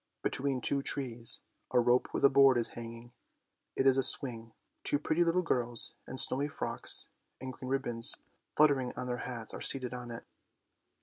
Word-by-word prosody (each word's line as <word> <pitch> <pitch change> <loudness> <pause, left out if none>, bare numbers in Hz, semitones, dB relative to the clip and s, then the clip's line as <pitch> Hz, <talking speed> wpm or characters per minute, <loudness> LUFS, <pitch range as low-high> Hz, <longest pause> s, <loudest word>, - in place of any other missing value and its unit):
" - - -55
Between 135 -1 -2
two 140 +4 0
trees 120 -5 0 0.3
a - - +1
rope 120 +1 +1
with - - 0
a - - +6
board 135 -2 +4
is 115 - -1
hanging; 115 0 -11 0.6
it 135 - -1
is 135 -1 +3
a - - +2
swing. 115 -3 +3 0.3
Two - - 0
pretty 155 +3 -1
little 170 +2 0
girls 120 -6 -1
in 130 - -8
snowy 140 +2 +5
frocks 150 - +1 0.3
and 130 0 -8
green 130 - -10
ribbons 120 -4 +3 0.4
fluttering 140 -4 +2
on 125 - -5
their 125 -1 -4
hats 120 -3 -7
are - - -9
seated 130 -2 0
on 125 -1 -8
it. 115 -1 -10
125 Hz, 180 wpm, -30 LUFS, 120-135 Hz, 0.6 s, a